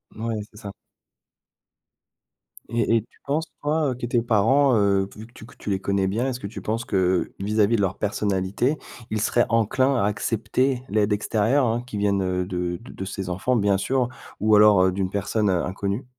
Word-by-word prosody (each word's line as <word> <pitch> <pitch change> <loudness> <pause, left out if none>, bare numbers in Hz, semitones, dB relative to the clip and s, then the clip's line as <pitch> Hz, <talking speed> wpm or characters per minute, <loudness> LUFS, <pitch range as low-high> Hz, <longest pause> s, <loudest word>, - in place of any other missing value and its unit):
Ouais, 115 +1 -3 0.2
c'est 105 - -17
ça. 100 -3 -7 2.0
Et 115 0 +2
et - - 0
tu - - -28
penses, 155 +3 -1 0.2
toi, 150 0 +1
heu, - - -3
que 120 - -5
tes 120 0 +1
parents, 120 +4 +3
heu, 100 -2 +2
vu 110 - -9
que 120 - -21
tu 110 - -12
tu - - -6
les 95 - 0
connais 100 0 0
bien, 115 +7 -1
est-ce 125 -2 -3
que - - -8
tu 105 - -8
penses 115 +2 -2
que, 95 -2 +1
vis-à-vis 105 +3 +2
de - - 0
leur 95 -1 -1
personnalité, 100 +6 0 0.3
ils 110 -1 -1
seraient 120 +2 +2
enclins 120 +4 +2
à 115 - +1
accepter 120 +5 0
l'aide 105 0 +2
extérieure, 110 +6 +1
hein, 115 +1 0
qui 125 -4 -6
vienne 95 -3 0
de 90 -1 -3
de 95 -5 -8
ses 95 -1 -5
enfants, 95 +8 0
bien 100 -3 +2
sûr, 125 +4 0 0.3
ou 110 0 +4
alors, 105 -2 +6
heu, 95 - +3
d'une 95 0 -2
personne, 105 +2 0
heu, 90 -3 +1
inconnue? 100 +6 -3
105 Hz, 195 wpm, -24 LUFS, 100-120 Hz, 2.0 s, alors